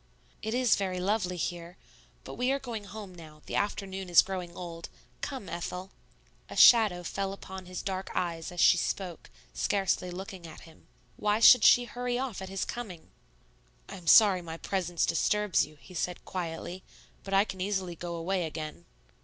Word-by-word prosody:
"It 220 +2 -2
is 250 -3 +3
very 185 -2 -2
lovely 185 -1 0
here. 175 +1 -4 0.5
But - - -8
we 250 +2 0
are 275 - +2
going 235 -6 -6
home 205 -2 -9
now; 155 -3 -13
the - - -5
afternoon 195 -2 -2
is 175 - +7
growing 180 -3 -5
old. 170 -2 -7 0.3
Come, 265 -9 -5
Ethel." 180 +3 -5 0.6
A - - -8
shadow 215 -7 +7
fell 195 +3 -3
upon 190 -1 -9
his 180 -1 -6
dark 190 0 -3
eyes 170 -2 -2
as 175 - -8
she 175 - +6
spoke, 180 -2 -3 0.2
scarcely 190 -2 0
looking 185 -1 -8
at 160 - -12
him. 165 -1 -17 0.3
Why 210 +1 +1
should 240 0 +8
she 245 - +7
hurry 245 0 -3
off 250 -7 -3
at 190 - -6
his 195 0 -2
coming? 200 -9 -7 0.8
"I - - -8
am 175 -3 -14
sorry 200 -5 +7
my 165 -1 -7
presence 175 -2 -1
disturbs 210 +2 +1
you," 155 0 -17
he 185 - -15
said 180 +1 -3
quietly; 175 0 -5 0.4
"But 195 0 -2
I 195 +2 +5
can 190 -3 -7
easily 190 -3 -2
go 170 +1 -5
away 175 +2 -1
again." 155 - -7
185 Hz, 180 wpm, -29 LUFS, 175-205 Hz, 0.8 s, should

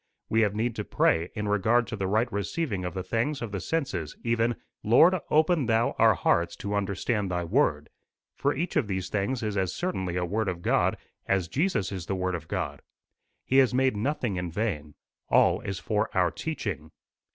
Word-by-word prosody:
We 110 - +3
have 105 -2 +1
need 115 +1 -1
to 105 - -2
pray 85 -3 +1
in 105 -1 -2
regard 110 +4 +3
to 115 - -3
the 95 -2 -2
right 110 +5 +2
receiving 100 - -2
of 90 - -4
the 95 - -3
things 125 +8 -1
of 115 -3 -5
the 100 - -3
senses 95 - -3
even, 115 0 +1 0.3
'Lord, 140 - +6 0.2
open 155 -3 +3
thou 115 0 +2
our - - +6
hearts 85 0 +1
to 100 +1 -4
understand 100 +1 -1
thy 90 -1 -1
word;' 85 - +1 0.5
for 140 - +1
each 170 +6 -3
of 145 -8 +2
these 95 -2 -3
things 110 +5 -1
is 105 -2 -2
as 95 -2 -1
certainly 95 - -2
a 90 0 0
word 105 +3 -1
of 85 -1 -5
God - - +2 0.3
as 95 -3 +1
Jesus 135 - 0
is 95 -3 -5
the 95 - -1
Word 95 0 -1
of 80 -2 -5
God. - - -3 0.6
He 130 - +2
has 130 -2 +5
made 130 -2 +2
nothing 120 -2 -1
in 90 -1 -3
vain. 80 -7 -3 0.3
All - - +4
is 100 -1 -4
for 105 +1 -1
our 90 -1 +3
teaching. 105 - -4
105 Hz, 195 wpm, -27 LUFS, 95-120 Hz, 0.6 s, Lord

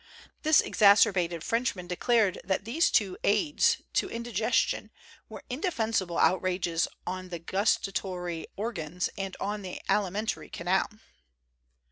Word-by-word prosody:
This 310 0 +5
exacerbated 185 -5 +4
Frenchman 230 -6 -1
declared 205 +3 +1
that 190 +1 -1
these 295 +10 +2
two 195 -5 +1
aids 295 - +2
to - - +1
indi 235 0 -6
gestion 215 +3 +1 0.4
were - - -9
indefensible 225 - -1
outrages 180 -1 +1 0.2
on 185 0 -5
the 175 - -4
gus 190 +5 +1
tatory 180 -4 -4
organs 180 -5 -3
and 195 -1 -5
on 205 +1 -3
the 185 -2 -6
alimentary 210 +4 -1
canal. 180 +3 0
195 Hz, 120 wpm, -28 LUFS, 180-225 Hz, 0.4 s, This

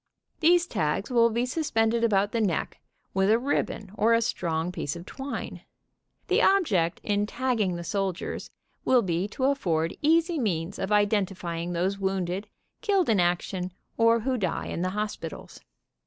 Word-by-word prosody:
"These 345 +1 +5
tags 195 - -1
will 235 -1 +5
be 235 +2 0
suspended 235 -5 +1
about 205 -2 +2
the 230 - 0
neck 190 -6 -1 0.3
with 190 +1 +2
a 220 - +5
ribbon 235 -6 -2
or 225 +2 +3
a 230 - +2
strong 165 -4 -1
piece 150 -4 -3
of 170 +1 -8
twine. 270 +6 -6 0.7
The - - +3
object 205 - +3
in 205 0 0
tagging 230 -7 0
the 170 - -5
soldiers 195 -1 -3 0.3
will 250 -2 +4
be 175 +1 -1
to 235 +5 -5
afford 170 - +1
easy 330 +2 +3
means 180 -5 -2
of 190 - -2
identifying 190 -5 0
those 185 +3 -1
wounded, 190 0 -2 0.3
killed 395 - +2
in 215 -4 +3
action, 180 +1 0 0.2
or 230 0 +4
who 255 +1 -1
die 190 - -1
in - - -4
the 185 - 0
hospitals. 210 +2 -5
205 Hz, 155 wpm, -27 LUFS, 180-235 Hz, 0.7 s, These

